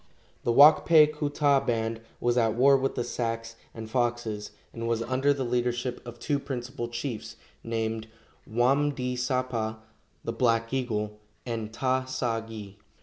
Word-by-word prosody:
The 120 - +1
Wak 145 +6 +8
pe 160 -2 +7
ku 150 -1 -3
ta 145 -1 +3
band 115 -2 -1 0.2
was 120 0 +1
at 115 -3 +2
war 135 +3 +6
with 135 0 0
the 120 - -1
Sacs 115 -1 -3 0.2
and 110 -1 -8
Foxes, 120 -3 -1 0.2
and 115 0 -4
was 115 -1 0
under 130 +4 +2
the 140 -2 0
leadership 120 0 -1
of 120 0 -8
two 140 +4 -1
principal 125 -2 -5
chiefs, 120 0 -5 0.3
named 115 -1 -2 0.4
Wam 135 +6 +2
di 125 -1 -2
sapa 125 -3 -1 0.5
(the 115 - -3
"Black 115 0 +1
Eagle") 105 -5 -2 0.3
and 115 -3 -4
Ta 130 +2 0
sa 125 -3 -1
gi. 105 -3 -9
120 Hz, 155 wpm, -28 LUFS, 115-130 Hz, 0.5 s, Wak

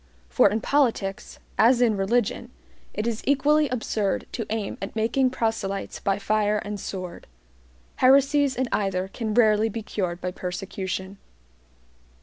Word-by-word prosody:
For 65 - +5
in 215 +3 -1
politics, 225 -9 0 0.2
as 240 +3 +5
in 235 -3 +3
religion, 235 +4 0 0.4
it 210 - -3
is 230 -2 -2
equally 295 +2 +3
absurd 220 -5 -1
to 225 - -4
aim 215 -2 -3
at 195 +2 -6
making 235 +4 +2
proselytes 220 -5 -2
by 195 -1 0
fire 210 0 +1
and 205 0 -5
sword. 185 -3 -7 0.7
Heresies 275 +1 +4
in 260 - 0
either 190 -2 -1
can 220 0 -4
rarely 220 -2 +4
be 225 +1 -5
cured 180 -4 -3
by 180 - -3
persecution. 190 +1 -5
215 Hz, 135 wpm, -25 LUFS, 195-245 Hz, 0.7 s, For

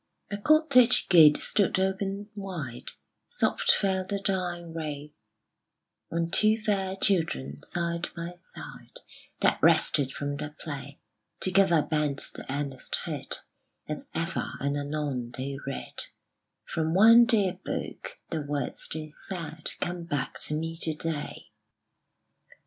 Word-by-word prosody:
A 205 - -2
cottage 255 -2 +5
gate 160 -5 +8
stood 200 -3 +2
open 195 +2 -1
wide: 175 - -6 0.3
Soft 485 - 0
fell 190 -2 +3
the 200 +2 -3
dying 175 -4 -2
ray 150 -2 -5 1.0
On 170 0 -1
two 215 0 +3
fair 195 -3 0
children, 75 - 0
side 170 0 -3
by 170 +1 -5
side, - - -11 0.4
That - - +3
rested 135 -2 +4
from 145 0 -4
their 150 0 -6
play 145 -2 -7 0.4
Together 185 -4 +4
bent 150 -3 0 0.2
the - - -7
earnest 140 -2 -2
head, - - -3 0.5
As - - -5
ever - - -2
and 140 +1 -1
anon 145 -4 -3
they 135 +1 -4
read 135 - -4 0.6
From 160 0 -1
one 230 +4 +8
dear 200 -6 +2
Book: - - -5
the 160 -2 -1
words 145 -2 -3
they 155 -1 -5 0.2
said 165 -4 -1
Come 175 -1 -3
back 145 -5 -3
to 150 - -1
me 165 +1 -3
to 160 -2 -1
day. 155 -1 -4
165 Hz, 125 wpm, -28 LUFS, 145-190 Hz, 1.0 s, gate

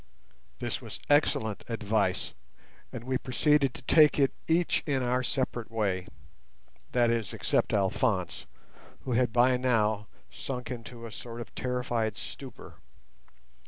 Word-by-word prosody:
This - - -3
was - - -7
excellent 110 -7 +2
advice, 105 - 0 0.6
and 120 - -6
we 130 +1 -1
proceeded 140 +1 +2
to - - -10
take 155 -2 +6
it 135 -2 +3
each 165 +1 +2
in 135 -3 +1
our 125 +1 +1
separate 125 -2 -2
way—that 95 - -3
is, 115 -4 -1
except - - +1
Alphonse, 95 - 0 0.5
who 130 - -5
had 125 0 +2
by 125 +2 +4
now 110 -4 +1 0.2
sunk 125 -1 -5
into 115 -1 -7
a 115 - -7
sort 115 +1 -7
of 120 - -8
terrified 125 -3 -1
stupor. - - -9
120 Hz, 125 wpm, -29 LUFS, 110-130 Hz, 0.6 s, take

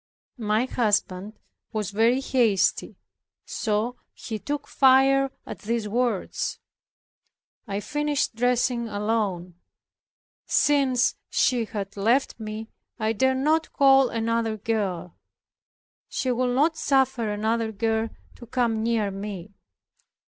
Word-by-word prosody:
My 215 +2 +1
husband 210 -5 0 0.4
was 210 -2 -3
very 230 +5 +3
hasty, 235 -7 +1 0.5
so 225 +3 -1 0.2
he 220 -2 -6
took 290 +5 -4
fire 270 0 +4 0.2
at - - -8
these 225 0 -2
words. 235 -2 -1 1.1
I 200 +1 -3
finished 295 +1 -1
dressing 245 0 +1
alone. 205 -5 -2 0.9
Since 265 -3 +2
she 245 -3 +2
had 200 -2 -6
left 230 +6 +1
me 220 +1 -6 0.3
I 220 -1 0
dared 260 +4 +2
not 310 +4 +1
call 270 -2 +5
another 230 -1 -1
girl; 195 -6 -2 0.9
she 260 - -1
would 245 0 0
not 315 +4 +2
suffer 265 -6 +1
another 220 +2 -1
girl 225 +1 -1 0.3
to 240 - -12
come 235 -3 0
near 220 -3 0
me. 195 -1 -7
230 Hz, 110 wpm, -25 LUFS, 210-260 Hz, 1.1 s, call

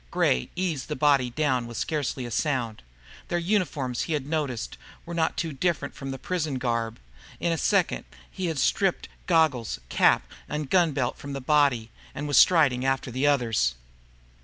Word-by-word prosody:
Gray 60 +1 +1
eased 170 -7 -2
the 150 - -3
body 140 -5 +3
down 130 -3 0
with 120 -1 -7
scarcely 145 -5 -2
a 120 - -6
sound. 120 - -1 0.5
Their 175 - 0
uniforms, 170 - 0
he 165 - -2
had 145 -3 -1
noticed, 145 -6 -2 0.3
were 170 - -7
not 165 -1 0
too 165 -3 -2
different 145 -1 -1
from 135 0 -6
his 135 - -7
prison 160 -6 -2
garb. 115 -3 -1 0.4
In 170 - 0
a 165 - 0
second 195 -4 +1 0.3
he 185 -2 -3
had 160 -2 -2
stripped 190 +7 +1 0.2
goggles, 140 - +2
cap, - - +4 0.3
and 150 -2 -4
gun 175 -5 +4
belt 130 -3 -1
from 140 0 -7
the 135 - -3
body, 135 -5 +2 0.2
and 145 - -4
was 145 - +2
striding 145 -8 +5
after 135 -1 0
the 130 +4 +1
others. 115 - +2
140 Hz, 175 wpm, -26 LUFS, 125-160 Hz, 0.5 s, striding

